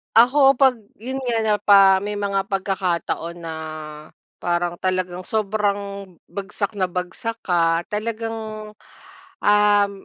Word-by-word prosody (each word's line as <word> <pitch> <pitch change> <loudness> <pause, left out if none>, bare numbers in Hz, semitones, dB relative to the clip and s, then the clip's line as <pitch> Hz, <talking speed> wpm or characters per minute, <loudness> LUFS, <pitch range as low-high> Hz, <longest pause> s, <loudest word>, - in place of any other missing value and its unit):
Ako 270 +4 +6
pag 265 -1 +3 0.2
yun 260 +3 -4
nga, 230 -2 +1
na 215 -1 +2
pa 195 -1 +6
may 205 +2 -3
mga 200 -1 -1
pagkakataon 185 -4 -2
na, 165 -1 -5 0.8
parang 175 0 -1
talagang 185 -1 -2
sobrang, 200 -2 -1 0.2
bagsak 200 +2 -4
na 190 - +2
bagsak 185 +6 -4
ka, 165 -2 +2
talagang, 225 +1 -3 1.0
uhm 205 -1 +4
200 Hz, 115 wpm, -22 LUFS, 185-220 Hz, 1.0 s, Ako